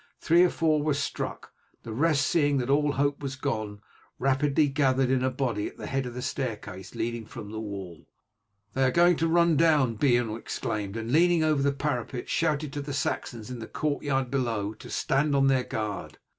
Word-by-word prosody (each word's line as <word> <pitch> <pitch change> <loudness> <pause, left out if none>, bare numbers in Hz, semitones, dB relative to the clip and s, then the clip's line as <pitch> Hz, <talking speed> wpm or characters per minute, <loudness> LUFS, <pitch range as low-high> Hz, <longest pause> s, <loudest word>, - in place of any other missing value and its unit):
Three 170 +2 +4
or 180 - +4
four 155 -3 +1
were 150 -1 +1
struck, 145 - -4 0.3
the 115 - -6
rest, 145 +2 +2
seeing 145 -3 +2
that 130 0 0
all 145 0 +3
hope 140 +1 0
was 135 -2 -4
gone, 110 -7 -3 0.4
rapidly 140 +3 +2
gathered 135 -2 +2
in 130 -1 +2
a 130 - +2
body 125 -5 -2
at - - -11
the - - -7
head 135 -1 -2
of 120 - -8
the 125 - -4
staircase 105 -8 -5
leading 115 0 -2
from 105 -1 -9
the 110 - -5
wall. 95 -6 -7 0.7
"They 135 - +1
are 130 - +4
going 175 +6 +5
to 165 - +1
run 170 -1 +4
down," 145 -8 +3
Beorn 120 -3 +2
exclaimed, 105 -2 -4
and 115 +1 -4
leaning 170 +2 +4
over 155 -3 +2
the 140 0 +3
parapet 130 -3 -3
shouted 155 -3 0
to 145 - -3
the 140 0 -5
Saxons 120 -4 -3
in 125 - -6
the 110 - -7
courtyard 140 -3 -1
below 115 -6 -1
to - - -12
stand 140 +2 +1
on 135 0 +4
their 135 -2 +3
guard. 105 -2 -4
135 Hz, 200 wpm, -27 LUFS, 115-145 Hz, 0.7 s, going